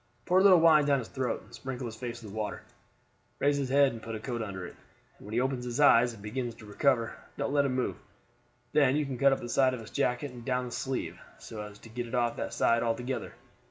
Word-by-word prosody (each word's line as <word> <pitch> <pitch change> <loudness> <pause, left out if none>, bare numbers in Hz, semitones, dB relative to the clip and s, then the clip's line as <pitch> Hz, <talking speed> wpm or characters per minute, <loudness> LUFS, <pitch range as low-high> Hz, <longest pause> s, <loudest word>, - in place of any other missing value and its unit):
Pour 180 +1 +4
a - - +5
little 190 -3 +7
wine 160 -2 +6
down 140 -1 +3
his 120 -4 -5
throat, 130 -3 -2
and - - -19
sprinkle 130 -1 -5
his 115 -2 -6
face 120 0 -6
with 105 -2 -9
water. 105 -1 -4 0.7
Raise 145 0 +2
his 135 -2 -2
head 140 0 +5
and 115 - -8
put 115 0 -5
a - - -5
coat 120 +1 -4
under 95 -4 -5
it, - - -10 0.4
and - - -13
when 105 - -7
he 120 - +2
opens 130 -1 -1
his 125 +2 -4
eyes 125 -4 +6
and 105 -3 -12
begins 120 +2 -3
to 110 - -13
recover, 115 +2 +1 0.2
don't 140 - -2
let 140 -1 +3
him 130 -2 0
move. 130 - -1 0.8
Then 140 -3 +4
you 150 0 +1
can 130 -3 -5
cut 140 0 +5
up 135 - 0
the - - -5
side 130 +1 +3
of - - -8
his 110 - -11
jacket 125 +3 0
and 120 -1 -10
down 125 0 -1
the 125 - -7
sleeve, 130 +1 -3 0.2
so 110 -2 -8
as 105 -1 -9
to 115 - -14
get 120 +2 -4
it 120 - -4
off 120 -1 +1
that - - -4
side 115 0 +3
altogether. 120 +3 -2
125 Hz, 260 wpm, -30 LUFS, 115-135 Hz, 0.8 s, little